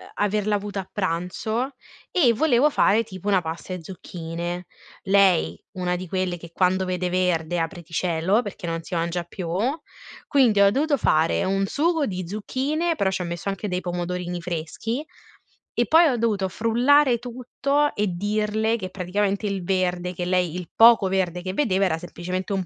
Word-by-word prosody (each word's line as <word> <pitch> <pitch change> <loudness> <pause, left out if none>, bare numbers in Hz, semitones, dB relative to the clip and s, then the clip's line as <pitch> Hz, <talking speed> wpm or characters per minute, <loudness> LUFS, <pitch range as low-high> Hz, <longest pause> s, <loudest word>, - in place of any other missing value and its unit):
averla 210 0 +1
avuta 200 -1 -3
a 190 - -15
pranzo 200 +8 -2 0.4
e 270 -10 +4
volevo 285 +2 +3
fare 225 -4 +3
tipo 190 -3 -9
una 195 -3 +3
pasta 165 +2 -6
e 180 - -4
zucchine. 175 0 -6 0.4
Lei, 190 - +3
una 180 -1 -1
di 180 +1 -6
quelle 185 0 -1
che 170 0 -12
quando 185 +2 +1
vede 180 -1 -1
verde, 175 -2 0
apriti 170 0 -5
cielo, 180 +6 +1
perché 200 -6 -7
non 165 0 -2
si 175 - -6
mangia 170 +1 -1
più, 175 +1 -7 0.8
quindi 250 -8 +4
ho 200 0 +6
dovuto 285 +5 +1
fare 160 -8 +2
un 195 +1 +1
sugo 315 - +1
di 185 -3 -4
zucchine, 280 - -1
però 200 -10 +1
c'ho 185 - -2
messo 170 +3 -4
anche 195 +2 -3
dei 180 -1 -2
pomodorini 175 0 -3
freschi 180 - -4 0.7
e 240 - +1
poi 330 +1 +6
ho 255 -5 +1
dovuto 210 -5 0
frullare 245 +5 +3
tutto 255 +4 -1
e 210 0 +1
dirle 215 +3 0
che 185 -4 -5
praticamente 195 +2 -1
il 195 -2 -3
verde, 180 -1 0
che 175 0 -4
lei 180 -2 +1
il 180 -3 -6
poco 225 -3 +7
verde 180 -2 0
che 185 - -3
vedeva 195 -5 +2
era 160 -4 0
semplicemente 180 +2 -5
un 190 -2 -1
190 Hz, 170 wpm, -24 LUFS, 175-220 Hz, 0.8 s, poco